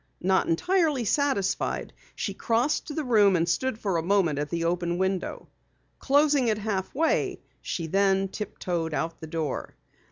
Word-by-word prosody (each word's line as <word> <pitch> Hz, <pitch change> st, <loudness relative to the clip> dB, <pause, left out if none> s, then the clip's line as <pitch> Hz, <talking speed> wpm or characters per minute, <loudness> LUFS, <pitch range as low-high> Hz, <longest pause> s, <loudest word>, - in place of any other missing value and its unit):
Not 190 Hz, +1 st, +2 dB
entirely 305 Hz, -, +1 dB
satisfied 275 Hz, -5 st, 0 dB, 0.2 s
she -, -, -3 dB
crossed 250 Hz, +6 st, 0 dB
the 310 Hz, -, -1 dB
room 210 Hz, -7 st, +4 dB
and 170 Hz, -1 st, +1 dB
stood 260 Hz, +6 st, 0 dB
for 195 Hz, -6 st, -1 dB
a -, -, 0 dB
moment 170 Hz, -5 st, +2 dB
at 145 Hz, 0 st, -2 dB
the 170 Hz, -1 st, -2 dB
open 175 Hz, 0 st, 0 dB
window. 190 Hz, 0 st, -2 dB, 0.5 s
Closing 285 Hz, -2 st, +3 dB
it 215 Hz, -2 st, +2 dB
half 205 Hz, -2 st, -3 dB
way, 320 Hz, +3 st, +1 dB, 0.2 s
she 170 Hz, -, -3 dB
then 195 Hz, +2 st, +2 dB
tiptoed 175 Hz, -5 st, -3 dB
out 165 Hz, 0 st, -3 dB
the 160 Hz, -, -6 dB
door. 155 Hz, -3 st, -4 dB
195 Hz, 155 wpm, -26 LUFS, 170-250 Hz, 0.5 s, room